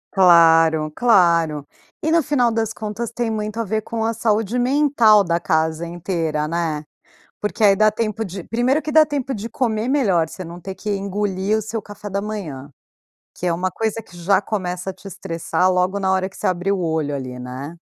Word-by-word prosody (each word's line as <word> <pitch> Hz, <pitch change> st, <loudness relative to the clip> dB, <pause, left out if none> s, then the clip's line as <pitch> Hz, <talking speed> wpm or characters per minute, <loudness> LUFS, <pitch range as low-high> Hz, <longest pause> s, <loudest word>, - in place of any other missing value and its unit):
Claro, 165 Hz, -4 st, +5 dB
claro. 170 Hz, -, +3 dB, 0.4 s
E 315 Hz, -, +1 dB
no 335 Hz, -, +4 dB
final 260 Hz, -5 st, +1 dB
das 225 Hz, -1 st, -1 dB
contas, 220 Hz, +2 st, -5 dB
tem 235 Hz, -1 st, -2 dB
muito 215 Hz, +1 st, -3 dB
a -, -, +1 dB
ver 220 Hz, +1 st, -1 dB
com 225 Hz, 0 st, -3 dB
a 230 Hz, -, 0 dB
saúde 225 Hz, +1 st, 0 dB
mental 245 Hz, -6 st, +4 dB
da 170 Hz, -1 st, 0 dB
casa 160 Hz, +1 st, 0 dB
inteira, 165 Hz, -3 st, -2 dB
né. 160 Hz, -2 st, -2 dB, 0.6 s
Porque 210 Hz, +1 st, -2 dB
aí 200 Hz, -1 st, +6 dB
dá 215 Hz, +2 st, +4 dB
tempo 215 Hz, 0 st, -2 dB
de 190 Hz, -2 st, -7 dB
primeiro 245 Hz, -, +1 dB
que 305 Hz, -, -4 dB
dá 310 Hz, +1 st, +6 dB
tempo 275 Hz, -3 st, -2 dB
de 225 Hz, +2 st, -5 dB
comer 225 Hz, -2 st, -1 dB
melhor, 195 Hz, -, +2 dB
você 185 Hz, -, -8 dB
não 170 Hz, +1 st, -9 dB
ter 190 Hz, +1 st, -7 dB
que 210 Hz, -, -4 dB
engolir 200 Hz, +1 st, -1 dB
o -, -, -1 dB
seu 220 Hz, +1 st, -4 dB
café 205 Hz, 0 st, -9 dB
da 200 Hz, +1 st, -1 dB
manhã, 160 Hz, -11 st, -6 dB, 0.7 s
que 180 Hz, -, -5 dB
é 175 Hz, -, +2 dB
uma 185 Hz, +2 st, -1 dB
coisa 225 Hz, +3 st, -2 dB
que 180 Hz, -, -19 dB
já 190 Hz, +3 st, +2 dB
começa 185 Hz, -3 st, -3 dB
a -, -, -6 dB
te 190 Hz, +2 st, -16 dB
estressar 180 Hz, +1 st, -1 dB
logo 180 Hz, +2 st, +1 dB
na 190 Hz, -1 st, +1 dB
hora 190 Hz, 0 st, 0 dB
que 195 Hz, -, -17 dB
você -, -, -3 dB
abrir 185 Hz, +2 st, 0 dB
o 195 Hz, -, -1 dB
olho 160 Hz, -3 st, -1 dB
ali, 130 Hz, -2 st, -6 dB
né. 130 Hz, +6 st, -7 dB
195 Hz, 205 wpm, -21 LUFS, 170-225 Hz, 0.7 s, aí